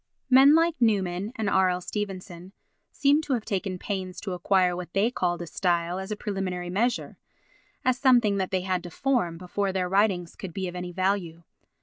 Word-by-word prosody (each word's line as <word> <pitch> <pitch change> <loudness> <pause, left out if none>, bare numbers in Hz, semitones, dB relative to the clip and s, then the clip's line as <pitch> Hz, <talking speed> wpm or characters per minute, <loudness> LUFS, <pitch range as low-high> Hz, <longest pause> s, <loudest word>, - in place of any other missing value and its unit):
Men 270 +3 +8
like 330 +1 +3
Newman 200 -3 +1
and 220 -2 -2
R. 190 -2 +3
L. 180 0 -1
Stevenson 185 -2 -6 0.4
seem 290 +1 +3
to 295 -3 -2
have 230 -4 -2
taken 190 -2 -2
pains 185 -1 -4
to 195 - -4
acquire 180 0 +2
what 175 -1 -7
they 205 +5 +2
called 175 -6 -1
a - - -6
style 175 0 -1
as 190 +1 -6
a 210 - -2
preliminary 185 -4 -4
measure—as 245 +3 -3
something 240 -6 +4
that 190 -1 -1
they 185 -1 0
had 185 -1 -1
to 175 - -8
form 230 -6 0
before 190 +3 -2
their 185 -1 -1
writings 190 -3 +1
could 180 -4 -8
be 190 -1 -2
of 175 - -7
any 180 0 -5
value. 185 -2 -1
190 Hz, 190 wpm, -26 LUFS, 180-210 Hz, 0.4 s, Men